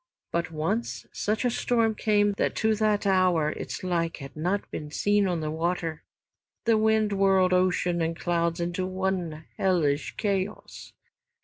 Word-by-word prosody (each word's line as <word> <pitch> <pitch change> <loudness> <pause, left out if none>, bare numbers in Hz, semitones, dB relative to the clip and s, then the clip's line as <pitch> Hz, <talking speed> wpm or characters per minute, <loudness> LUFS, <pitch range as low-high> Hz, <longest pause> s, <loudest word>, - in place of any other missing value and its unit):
But 170 -1 -1
once 165 +9 -2
such 215 +4 -1
a 245 - +2
storm 230 -1 +1
came 205 -1 +2
that - - 0
to 220 0 +2
that 215 -1 +1
hour 185 -5 +3
its - - -6
like 170 -2 -1
had 140 -2 -10
not 180 +6 -1
been 150 - -5 0.4
on 175 -3 -1
the 155 0 -2
water. 165 -1 -2 0.6
The 230 -1 +4
wind 220 -1 +2
whirled 190 -2 +3
ocean 180 -1 +2
and 165 0 -1
clouds 170 -1 0
into 175 +2 -2
one 185 -4 -2
hellish 160 -7 +1
chaos. 200 -1 -3
185 Hz, 145 wpm, -27 LUFS, 165-205 Hz, 0.6 s, The